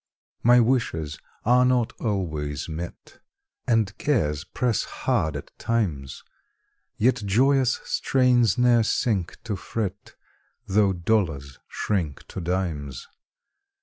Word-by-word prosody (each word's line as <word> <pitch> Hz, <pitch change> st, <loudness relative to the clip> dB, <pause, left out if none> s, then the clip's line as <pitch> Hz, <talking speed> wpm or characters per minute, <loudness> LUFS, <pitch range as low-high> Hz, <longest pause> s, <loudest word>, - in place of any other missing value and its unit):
My 120 Hz, +1 st, +6 dB
wishes 110 Hz, -, 0 dB, 0.3 s
are 125 Hz, +2 st, +5 dB
not 125 Hz, -2 st, +2 dB
always 80 Hz, -, -2 dB
met, 85 Hz, +2 st, -8 dB, 0.5 s
And 110 Hz, -4 st, +2 dB
cares 75 Hz, -, 0 dB
press 120 Hz, -4 st, 0 dB
hard 80 Hz, -2 st, -1 dB
at 70 Hz, -, -8 dB
times; 85 Hz, -, -2 dB, 0.7 s
Yet 125 Hz, +4 st, +3 dB
joyous 130 Hz, +5 st, +3 dB
strains 125 Hz, -5 st, +2 dB
ne'er 120 Hz, -1 st, +5 dB
sink 105 Hz, -4 st, 0 dB
to 110 Hz, -3 st, -3 dB
fret, 100 Hz, 0 st, -5 dB, 0.5 s
Tho' 100 Hz, 0 st, +3 dB
dollars 85 Hz, -8 st, -1 dB
shrink 85 Hz, -9 st, -2 dB
to 95 Hz, -, -6 dB
dimes. 80 Hz, -7 st, -3 dB
100 Hz, 105 wpm, -25 LUFS, 80-120 Hz, 0.7 s, My